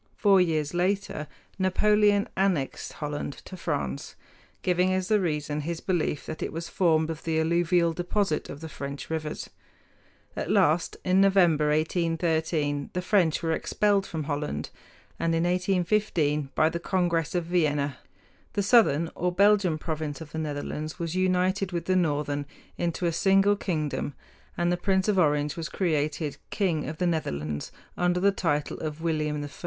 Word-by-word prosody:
Four 195 -3 +5
years 155 -4 0
later 180 -3 -1 0.3
Napoleon 205 +2 +3
annexed 185 -8 0
Holland 150 -2 -4
to 185 - -8
France, 70 - -3 0.5
giving 180 +1 +2
as 185 +1 -1
the 215 -1 +4
reason 150 -4 -1
his 165 +2 -3
belief 175 -6 -1
that 155 - -6
it - - -2
was 165 +1 -5
formed 160 -3 +2
of 160 - -7
the 160 -1 0
alluvial 170 +1 +2
deposit 175 0 -1
of 145 - -8
French 140 +2 -6
rivers. 155 -1 -4 0.8
At - - -3
last, 160 +3 +2
in 185 +1 +4
November, 175 -6 +4
1813, 160 -2 0
the 180 - -1
French 180 -5 +2
were 165 - +1
expelled 200 +4 +1
from 160 -2 -4
Holland; 145 - -3 0.5
and 165 0 +1
in 165 - +1
1815, 180 -5 +1
by 155 - +4
the 170 +1 -2
Congress 170 -3 0
of 175 -2 0
Vienna, 150 -5 0 0.5
the 200 - 0
southern 170 - +4
or 180 +1 -1
Belgian 200 -3 +4
province 155 -3 -4
of 160 -2 -10
the 160 - -4
Netherlands 155 +1 -4
was 170 -2 -3
united 185 +1 +1
with 170 -1 -3
the 185 - +2
northern 145 -4 0 0.3
into 175 +1 -2
a 170 - +2
single 195 +3 +4
kingdom, 155 -7 -2 0.4
and 175 0 +1
the 175 - +1
Prince 190 +1 +1
of 205 -3 +3
Orange 150 -3 +2
was 165 -1 -4
created 155 -4 -1
king 170 -8 0
of 155 - -6
the 180 - 0
Netherlands 75 - -2 0.2
under 180 0 +1
the 200 +2 +4
title 150 -6 -1
of 155 0 -5
William 150 -2 -1
I. - - -7
165 Hz, 160 wpm, -27 LUFS, 150-185 Hz, 0.8 s, Four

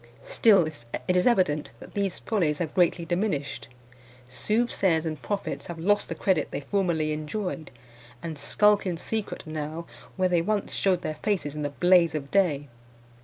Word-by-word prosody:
Still 200 -7 +5
it 150 +4 -4
is 180 - +3
evident 180 -10 +2
that - - -12
these 200 -3 -1
follies 170 -9 0
have 165 -3 -3
greatly 175 -1 +2
diminished. 175 -4 -2 0.6
Soothsayers 190 - +1
and 155 -2 -4
prophets 205 -1 -3
have 170 - -6
lost 205 +5 +1
the - - -3
credit 185 -6 +1
they - - -4
formerly 160 -1 0
enjoyed, 155 +2 -4 0.5
and 165 -2 -4
skulk 205 +8 +3
in 175 -2 -1
secret 220 +4 -4
now 155 +1 -5 0.3
where 185 -1 +2
they 175 -2 +2
once 205 +3 -1
shewed 185 -2 +1
their 155 - -2
faces 180 -9 -1
in 150 - -4
the 145 - -1
blaze 175 +1 +4
of 140 -2 -5
day. 155 -8 +2
175 Hz, 165 wpm, -26 LUFS, 155-195 Hz, 0.6 s, Still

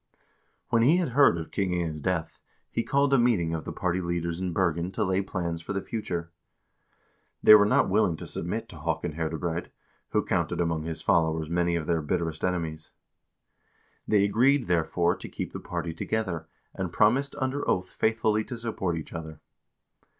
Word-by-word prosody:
When 115 -1 +3
he 145 +9 +5
had 175 -6 0
heard 135 -7 +5
of 80 -1 -6
King 95 -2 0
Inge's 80 -3 -2
death, 85 -2 -2 0.3
he 115 - 0
called 140 +2 +2
a 135 - +5
meeting 100 -9 +2
of 80 -1 -4
the - - -4
party 90 0 -1
leaders 85 -1 -2
in 95 -1 -2
Bergen 85 0 0
to 110 - 0
lay 95 -1 +1
plans 85 -4 -3
for 95 - -5
the 100 - -1
future. 85 -7 -4 1.1
They - - +10
were 105 -1 +8
not - - +3
willing 95 -4 +2
to - - -8
submit 110 +7 -3
to 85 - -11
Haakon 80 +2 -2
Herdebreid, 80 +2 -3 0.4
who - - 0
counted 85 - 0
among 80 -2 0
his 80 -1 -4
followers 80 -1 +1
many 85 0 +1
of 80 -2 -2
their 85 -1 +1
bitterest 80 0 -2
enemies. 80 -4 -2 1.1
They 105 -2 +4
agreed, 125 +6 +3
therefore, 85 0 +1
to - - -8
keep - - -5
the - - -5
party 85 -1 -4
together, 85 -3 -2 0.3
and 95 -3 -4
promised 130 +10 +3
under 135 +1 -1
oath 95 0 0
faithfully 110 -1 +1
to 125 - -6
support 100 -7 -2
each 80 - -7
other. 80 -2 -7
90 Hz, 180 wpm, -27 LUFS, 80-110 Hz, 1.1 s, They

